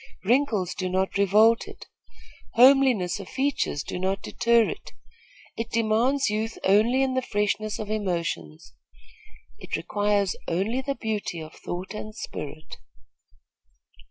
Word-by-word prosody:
Wrinkles 220 Hz, -5 st, +1 dB
do 185 Hz, -2 st, -3 dB
not 190 Hz, +1 st, -1 dB
revolt 215 Hz, +4 st, +4 dB
it. -, -, -11 dB, 0.7 s
Homeliness 250 Hz, -7 st, +5 dB
of 195 Hz, -, -9 dB
features 270 Hz, -, -1 dB
do 180 Hz, -, -5 dB
not 190 Hz, +1 st, -1 dB
deter 235 Hz, 0 st, +3 dB
it. -, -, -7 dB, 0.6 s
It 230 Hz, 0 st, -3 dB
demands 230 Hz, +5 st, +2 dB
youth 220 Hz, +1 st, -2 dB
only 225 Hz, +7 st, +4 dB
in 265 Hz, -1 st, 0 dB
the 260 Hz, -, +1 dB
freshness 210 Hz, -2 st, -1 dB
of 215 Hz, -1 st, -5 dB
emotions. 170 Hz, -, -3 dB, 0.9 s
It -, -, -4 dB
requires 205 Hz, +1 st, 0 dB
only 200 Hz, +9 st, 0 dB
the 275 Hz, +1 st, -3 dB
beauty 210 Hz, -7 st, -3 dB
of 155 Hz, 0 st, -9 dB
thought 180 Hz, +3 st, -6 dB
and 215 Hz, 0 st, -7 dB
spirit. 155 Hz, -7 st, -7 dB
210 Hz, 130 wpm, -25 LUFS, 185-235 Hz, 0.9 s, Homeliness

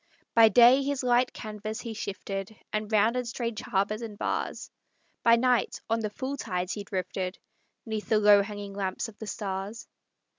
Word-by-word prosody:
By 225 Hz, -1 st, +7 dB
day 245 Hz, +5 st, +7 dB
his 275 Hz, -1 st, -2 dB
light 245 Hz, 0 st, +3 dB
canvas 215 Hz, 0 st, -6 dB
he 230 Hz, -2 st, -5 dB
shifted, 200 Hz, 0 st, -5 dB, 0.2 s
And 215 Hz, 0 st, -2 dB
rounded 230 Hz, +4 st, +2 dB
strange 235 Hz, -2 st, -3 dB
harbors 205 Hz, +3 st, -1 dB
and 220 Hz, -3 st, -7 dB
bars; -, -, -3 dB, 0.5 s
By 230 Hz, 0 st, +6 dB
night, 250 Hz, 0 st, +1 dB
on 225 Hz, -, +2 dB
the 215 Hz, -1 st, -2 dB
full 260 Hz, +6 st, -4 dB
tides 180 Hz, -6 st, -2 dB
he 205 Hz, -, -5 dB
drifted, 185 Hz, -1 st, -3 dB, 0.5 s
'Neath 220 Hz, -2 st, -4 dB
the 220 Hz, -, +4 dB
low 205 Hz, -1 st, +7 dB
hanging 205 Hz, -1 st, -6 dB
lamps 195 Hz, +2 st, -3 dB
of 215 Hz, -, -17 dB
the 220 Hz, -, -7 dB
stars. 200 Hz, +2 st, -4 dB
215 Hz, 170 wpm, -28 LUFS, 200-235 Hz, 0.5 s, By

